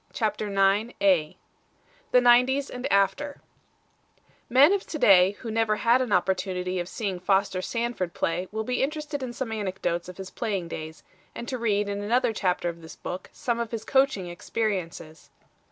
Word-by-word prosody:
] -, -, -31 dB
CHAPTER 215 Hz, -2 st, -1 dB
IX 200 Hz, +3 st, +2 dB
THE 200 Hz, -, -1 dB
NINETIES 250 Hz, +3 st, +4 dB
AND 250 Hz, +2 st, -4 dB
AFTER 280 Hz, +9 st, +1 dB, 1.1 s
Men 275 Hz, +9 st, +6 dB
of 400 Hz, -, -2 dB
to 310 Hz, -, -4 dB
day 190 Hz, -6 st, +6 dB
who 230 Hz, -, -5 dB
never 220 Hz, -1 st, +1 dB
had 235 Hz, +4 st, +3 dB
an 250 Hz, -4 st, -2 dB
opportunity 185 Hz, -2 st, 0 dB
of 175 Hz, +1 st, -4 dB
seeing 195 Hz, -6 st, -3 dB
Foster 190 Hz, 0 st, +1 dB
Sanford 230 Hz, -5 st, -3 dB
play 175 Hz, +3 st, -1 dB
will 220 Hz, +1 st, -2 dB
be 250 Hz, +2 st, -1 dB
interested 295 Hz, 0 st, -2 dB
in 255 Hz, -2 st, -4 dB
some 240 Hz, -1 st, -4 dB
anecdotes 185 Hz, -5 st, -2 dB
of 180 Hz, -, -10 dB
his 190 Hz, -1 st, -8 dB
playing 195 Hz, -7 st, -3 dB
days 160 Hz, 0 st, -7 dB, 0.3 s
and 235 Hz, -, -6 dB
to 255 Hz, -, -3 dB
read 210 Hz, -3 st, +1 dB
in 200 Hz, 0 st, -3 dB
another 235 Hz, +3 st, +1 dB
chapter 180 Hz, -4 st, 0 dB
of 170 Hz, -1 st, -5 dB
this 160 Hz, 0 st, -11 dB
book 180 Hz, -, -7 dB
some 235 Hz, -1 st, -2 dB
of 235 Hz, -1 st, -2 dB
his 225 Hz, -2 st, -5 dB
coaching 265 Hz, -8 st, +2 dB
experiences. 175 Hz, -3 st, -4 dB
210 Hz, 170 wpm, -26 LUFS, 185-245 Hz, 1.1 s, Men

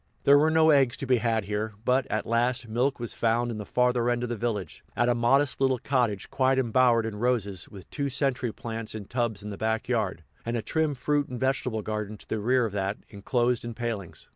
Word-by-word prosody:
There 140 Hz, +1 st, +7 dB
were 155 Hz, +2 st, +4 dB
no 160 Hz, 0 st, +5 dB
eggs 135 Hz, -5 st, +3 dB
to -, -, -4 dB
be 130 Hz, -1 st, +3 dB
had 110 Hz, -2 st, 0 dB
here; 105 Hz, +2 st, -2 dB
but, 130 Hz, +1 st, +2 dB
at 110 Hz, -, -2 dB
last, 120 Hz, +1 st, 0 dB
milk 125 Hz, +5 st, 0 dB
was 120 Hz, -1 st, -3 dB
found 120 Hz, +1 st, +1 dB
in 110 Hz, -, -5 dB
the 105 Hz, -, -7 dB
farther 125 Hz, -1 st, +2 dB
end 120 Hz, 0 st, 0 dB
of 120 Hz, -, -3 dB
the 120 Hz, -, -2 dB
village, 105 Hz, -6 st, -3 dB
at 120 Hz, -, +2 dB
a -, -, +4 dB
modest 130 Hz, +4 st, +2 dB
little 130 Hz, -1 st, +3 dB
cottage 120 Hz, -6 st, -1 dB
quite 130 Hz, 0 st, +2 dB
embowered 120 Hz, -2 st, +3 dB
in 110 Hz, -2 st, -4 dB
roses, 105 Hz, -6 st, -1 dB
with 95 Hz, -3 st, -12 dB
two 140 Hz, -2 st, -2 dB
century 130 Hz, -3 st, 0 dB
plants 115 Hz, 0 st, -6 dB
in 105 Hz, -2 st, -6 dB
tubs 115 Hz, -3 st, -2 dB
in 105 Hz, -, -6 dB
the 100 Hz, -, -6 dB
back 110 Hz, 0 st, -1 dB
yard, 105 Hz, -9 st, -1 dB, 0.2 s
and 115 Hz, +1 st, -2 dB
a 110 Hz, -, -3 dB
trim 155 Hz, -2 st, 0 dB
fruit 145 Hz, +2 st, 0 dB
and 125 Hz, -1 st, -6 dB
vegetable 125 Hz, -4 st, -1 dB
garden 105 Hz, 0 st, -4 dB
to -, -, -14 dB
the 110 Hz, -, -2 dB
rear 125 Hz, +3 st, +2 dB
of 105 Hz, -, -4 dB
that, 100 Hz, 0 st, -1 dB
enclosed 120 Hz, +4 st, 0 dB
in 120 Hz, -1 st, -6 dB
palings. 115 Hz, -7 st, -5 dB
120 Hz, 230 wpm, -27 LUFS, 110-130 Hz, 0.2 s, There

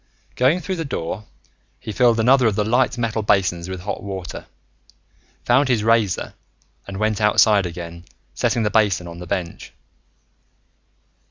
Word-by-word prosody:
Going 140 Hz, +8 st, +2 dB
through 185 Hz, +3 st, -4 dB
the 165 Hz, -, -2 dB
door, 105 Hz, -, -5 dB, 0.5 s
he -, -, -6 dB
filled 120 Hz, 0 st, +3 dB
another 125 Hz, +2 st, +4 dB
of 105 Hz, -, 0 dB
the 105 Hz, -, +1 dB
light 120 Hz, +3 st, +1 dB
metal 115 Hz, -2 st, -1 dB
basins 95 Hz, -4 st, +1 dB
with 95 Hz, -1 st, -5 dB
hot 100 Hz, +3 st, -4 dB
water, 95 Hz, -3 st, -7 dB, 1.0 s
found 130 Hz, +3 st, +3 dB
his 115 Hz, -4 st, +1 dB
razor, 110 Hz, -4 st, +1 dB, 0.5 s
and 100 Hz, -1 st, -6 dB
went 110 Hz, 0 st, 0 dB
outside 105 Hz, -2 st, +4 dB
again, 85 Hz, 0 st, -8 dB, 0.3 s
setting 115 Hz, -, 0 dB
the 105 Hz, -, 0 dB
basin 100 Hz, -6 st, +2 dB
on 85 Hz, 0 st, -9 dB
the 90 Hz, -, -8 dB
bench. 85 Hz, -1 st, -5 dB
105 Hz, 150 wpm, -21 LUFS, 90-120 Hz, 1.0 s, another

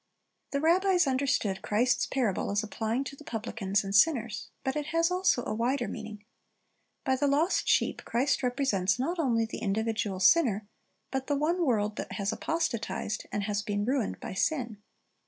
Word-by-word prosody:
The 280 Hz, -, -1 dB
rabbis 355 Hz, +3 st, +3 dB
understood 260 Hz, -7 st, 0 dB
Christ's 240 Hz, +4 st, +1 dB
parable 240 Hz, -8 st, 0 dB
as 205 Hz, +2 st, 0 dB
applying 220 Hz, +4 st, -2 dB
to 275 Hz, +1 st, -7 dB
the 300 Hz, -, -14 dB
publicans 210 Hz, -5 st, -2 dB
and 195 Hz, 0 st, -3 dB
sinners; 235 Hz, -5 st, +2 dB
but 265 Hz, -, -1 dB
it 300 Hz, -1 st, -2 dB
has 330 Hz, +2 st, +2 dB
also 365 Hz, -9 st, +2 dB
a -, -, -2 dB
wider 240 Hz, +2 st, 0 dB
meaning. 210 Hz, -1 st, -7 dB, 0.8 s
By 265 Hz, -3 st, +2 dB
the 285 Hz, +2 st, +1 dB
lost 300 Hz, +6 st, +2 dB
sheep -, -, +2 dB
Christ 260 Hz, +5 st, +1 dB
represents 245 Hz, -7 st, +1 dB
not 330 Hz, +8 st, -2 dB
only 235 Hz, -7 st, +2 dB
the 225 Hz, -, -6 dB
individual 215 Hz, -2 st, -1 dB
sinner, 215 Hz, -, +4 dB, 0.4 s
but 265 Hz, 0 st, -2 dB
the 290 Hz, -, +1 dB
one 335 Hz, +5 st, +1 dB
world 215 Hz, -7 st, +1 dB
that -, -, -5 dB
has 200 Hz, +1 st, -1 dB
apostatized, 250 Hz, -8 st, -2 dB
and 205 Hz, -, -1 dB
has 205 Hz, 0 st, -1 dB
been 205 Hz, -1 st, -2 dB
ruined 255 Hz, -2 st, -1 dB
by -, -, -6 dB
sin. 235 Hz, -, -1 dB
240 Hz, 170 wpm, -29 LUFS, 210-285 Hz, 0.8 s, sinner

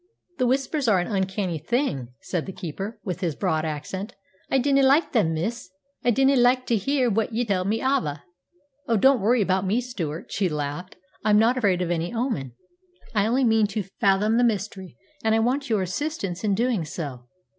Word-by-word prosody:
"The 255 Hz, -, +3 dB
Whispers 270 Hz, +2 st, 0 dB
are 210 Hz, -4 st, +5 dB
an 175 Hz, -, -1 dB
uncanny 190 Hz, -3 st, -1 dB
thing," 175 Hz, -, -1 dB
said 175 Hz, -2 st, -3 dB
the -, -, -4 dB
keeper, 190 Hz, +5 st, -6 dB
with 180 Hz, -4 st, -4 dB
his 170 Hz, -6 st, -2 dB
broad 155 Hz, +6 st, 0 dB
accent. 185 Hz, +8 st, -5 dB, 0.3 s
"I -, -, +3 dB
dinna 275 Hz, +1 st, +3 dB
like 275 Hz, +4 st, +4 dB
them, 165 Hz, -10 st, +2 dB
miss; 220 Hz, +6 st, -3 dB, 0.3 s
I -, -, +2 dB
dinna 270 Hz, +4 st, +4 dB
like 250 Hz, +1 st, +4 dB
tae 235 Hz, -, +1 dB
hear 260 Hz, +5 st, +1 dB
what 225 Hz, 0 st, 0 dB
ye 240 Hz, +2 st, 0 dB
tell 190 Hz, -4 st, 0 dB
me 220 Hz, +5 st, -1 dB
ava." 160 Hz, -, 0 dB, 0.6 s
"Oh, 230 Hz, -, +2 dB
don't 265 Hz, +2 st, +4 dB
worry 225 Hz, +2 st, +3 dB
about 190 Hz, 0 st, +1 dB
me, 200 Hz, +5 st, +1 dB
Stewart," 175 Hz, -11 st, -5 dB
she 195 Hz, -3 st, 0 dB
laughed. 150 Hz, +4 st, -4 dB, 0.3 s
"I'm 210 Hz, -1 st, +4 dB
not 230 Hz, +4 st, +4 dB
afraid 195 Hz, -7 st, +1 dB
of 175 Hz, -, -2 dB
any 170 Hz, 0 st, -1 dB
omen. 230 Hz, -, -2 dB, 0.6 s
I 210 Hz, -1 st, +2 dB
only 255 Hz, +4 st, +2 dB
mean 225 Hz, -3 st, +4 dB
to 205 Hz, +1 st, -3 dB, 0.2 s
fathom 205 Hz, +3 st, +3 dB
the -, -, +4 dB
mystery, 200 Hz, -4 st, -2 dB, 0.3 s
and 220 Hz, 0 st, +3 dB
I -, -, +3 dB
want 260 Hz, +4 st, 0 dB
your 210 Hz, -4 st, +1 dB
assistance 195 Hz, -, -3 dB
in 205 Hz, -2 st, +2 dB
doing 235 Hz, -4 st, +1 dB
so. 140 Hz, -6 st, -6 dB
210 Hz, 195 wpm, -24 LUFS, 180-245 Hz, 0.6 s, are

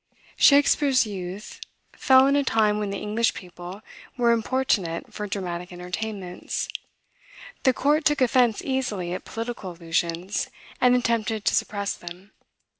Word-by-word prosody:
Shakspeare's 280 Hz, -2 st, +5 dB
youth 195 Hz, 0 st, -7 dB, 0.3 s
fell 260 Hz, 0 st, +5 dB
in 275 Hz, +1 st, +3 dB
a 285 Hz, -, +3 dB
time 215 Hz, -4 st, +2 dB
when 210 Hz, -1 st, -2 dB
the 200 Hz, -, -3 dB
English 215 Hz, +3 st, 0 dB
people 180 Hz, +2 st, -9 dB, 0.3 s
were 240 Hz, -1 st, +4 dB
importunate 225 Hz, -7 st, 0 dB
for 210 Hz, -1 st, -4 dB
dramatic 180 Hz, -3 st, -4 dB
entertainments. 180 Hz, +1 st, -4 dB, 1.0 s
The 260 Hz, -, +5 dB
court 295 Hz, +5 st, +2 dB
took 295 Hz, +1 st, +2 dB
offence 245 Hz, -3 st, +3 dB
easily 215 Hz, -10 st, -2 dB
at 185 Hz, -, -6 dB
political 225 Hz, -5 st, -5 dB
allusions, 170 Hz, +2 st, -2 dB, 0.3 s
and 250 Hz, 0 st, +5 dB
attempted 230 Hz, -3 st, 0 dB
to -, -, +3 dB
suppress 200 Hz, -1 st, -1 dB
them. 180 Hz, +3 st, -11 dB
210 Hz, 130 wpm, -25 LUFS, 180-250 Hz, 1.0 s, Shakspeare's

